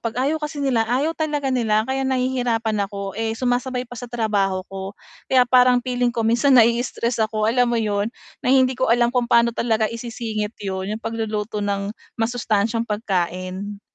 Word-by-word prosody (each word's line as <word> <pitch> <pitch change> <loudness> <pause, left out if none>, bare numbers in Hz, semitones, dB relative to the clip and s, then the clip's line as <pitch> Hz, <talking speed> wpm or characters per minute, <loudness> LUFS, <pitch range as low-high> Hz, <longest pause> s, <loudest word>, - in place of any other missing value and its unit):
'Pag 230 0 -4
ayaw 310 +3 0
kasi 300 0 -5
nila, 255 -5 +2
ayaw 275 +7 +1
talaga 295 -3 -1
nila 220 -4 +2
kaya 265 +1 0
nahihirapan 245 -5 0
ako, 200 -1 -5
eh, 225 0 -1
sumasabay 250 +1 -1
pa 245 - -9
sa 245 +2 -7
trabaho 200 -5 0
ko. 195 0 -5 0.4
Kaya 255 -1 +5
parang 250 0 +5
feeling 245 -1 0
ko 230 -2 -1
minsan 245 +4 +4
nai-stress 235 0 +2
ako 215 0 -2
alam 245 +1 +3
mo 235 - +1
'yon, 205 0 0 0.4
na - - +1
hindi 260 -1 +4
ko 260 - 0
alam 240 0 +3
kung 245 -2 0
paano 235 -1 +4
talaga 225 -2 +1
isisingit 230 -2 -4
'yon, 190 +1 -3
'yong 225 - -12
pagluluto 215 -2 -3
ng 200 0 -2 0.3
masustansyang 225 -1 0
pagkain. 190 -1 -3
230 Hz, 170 wpm, -22 LUFS, 210-250 Hz, 0.4 s, Kaya